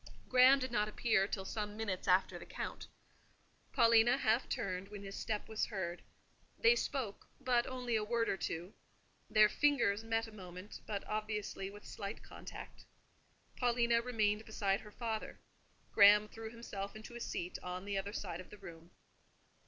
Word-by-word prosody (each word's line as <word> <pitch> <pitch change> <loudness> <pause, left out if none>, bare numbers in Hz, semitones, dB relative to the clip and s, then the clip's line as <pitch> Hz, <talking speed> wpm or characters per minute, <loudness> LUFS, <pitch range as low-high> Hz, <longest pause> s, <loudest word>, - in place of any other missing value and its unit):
Graham 255 +2 +7
did 260 -2 -3
not 210 -3 +2
appear 210 -2 +2
till 190 -2 -4
some 210 0 -4
minutes 200 -5 -3
after 185 +1 +3
the - - -10
Count. - - -5 0.8
Paulina 230 +2 +5
half 230 -1 +2
turned 185 0 -2
when 205 0 -9
his 195 0 -7
step 210 -2 -3
was 220 -1 -1
heard: 180 -4 -4 0.6
they 465 0 +6
spoke, 260 - -3
but 245 -3 +2
only 250 -2 -2
a 215 - +1
word 230 +1 0
or - - +1
two; 175 0 -4 0.6
their 215 -1 +7
fingers 225 -5 +2
met 225 0 0
a 220 - -11
moment, 185 -1 -9
but 205 -2 -3
obviously 210 -2 -3
with 205 +1 -12
slight 200 +1 -6
contact. - - -10 0.7
Paulina 235 -1 +3
remained 215 -3 +1
beside 200 -3 0
her 210 - -11
father; 220 -1 -4 0.5
Graham 205 +1 +7
threw 225 +1 -8
himself 205 -4 -6
into 220 +2 -9
a - - -5
seat 180 -6 -4
on 180 +1 -5
the 200 0 -2
other 200 +1 -4
side 185 -5 -4
of 185 - -14
the 210 - -11
room. 170 -3 -11
215 Hz, 165 wpm, -35 LUFS, 195-230 Hz, 0.8 s, Graham